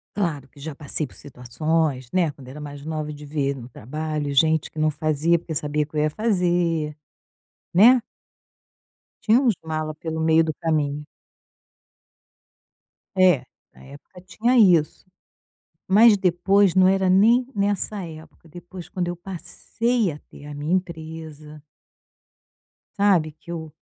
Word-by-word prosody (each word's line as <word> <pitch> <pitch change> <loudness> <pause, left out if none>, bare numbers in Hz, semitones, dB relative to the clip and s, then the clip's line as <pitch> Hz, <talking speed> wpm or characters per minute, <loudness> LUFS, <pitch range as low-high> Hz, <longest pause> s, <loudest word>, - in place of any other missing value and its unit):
Claro 160 -9 -2
que 140 - -20
já 155 0 -7
passei 150 0 -3
por - - -19
situações, 140 +1 -2
né, 180 -4 +2
quando 135 -2 -15
era 140 +4 -9
mais 145 0 -9
nova, 155 -1 -4
de 150 0 -10
ver 140 -2 -1
no 120 -2 -9
trabalho 150 +5 -4
gente 160 +1 +3
que - - -18
não 155 0 +2
fazia, 155 +3 +1
porque 160 -2 -7
sabia 150 0 -1
que 155 - -16
eu 150 - +2
ia 155 - +2
fazer, 175 -6 0 0.8
né? 235 +6 +6 1.2
Tinha 225 +3 +5
uns 250 -5 +3
mala 155 -1 -4
pelo 160 0 -5
meio 160 0 +4
do 155 -1 -2
caminho. 150 -2 -1 2.1
É, 180 -9 +4 0.3
na - - -17
época 145 +6 -14
tinha 230 +7 0
isso. 175 -8 +4 0.8
Mas, 210 +2 +6
depois, 190 +1 +3
não 185 0 +6
era 190 -1 +2
nem 230 +7 +4
nessa 200 0 -1
época, 160 0 -12
depois, 175 +2 -11
quando 180 -4 -3
eu 175 - -3
passei 200 +4 -2
a 145 - -8
ter 145 - -13
a 150 - -8
minha 150 +5 -2
empresa 160 -4 -5 1.4
sabe, 180 -6 +3
que 165 +2 -12
eu 160 -2 -7
160 Hz, 145 wpm, -23 LUFS, 150-185 Hz, 2.1 s, né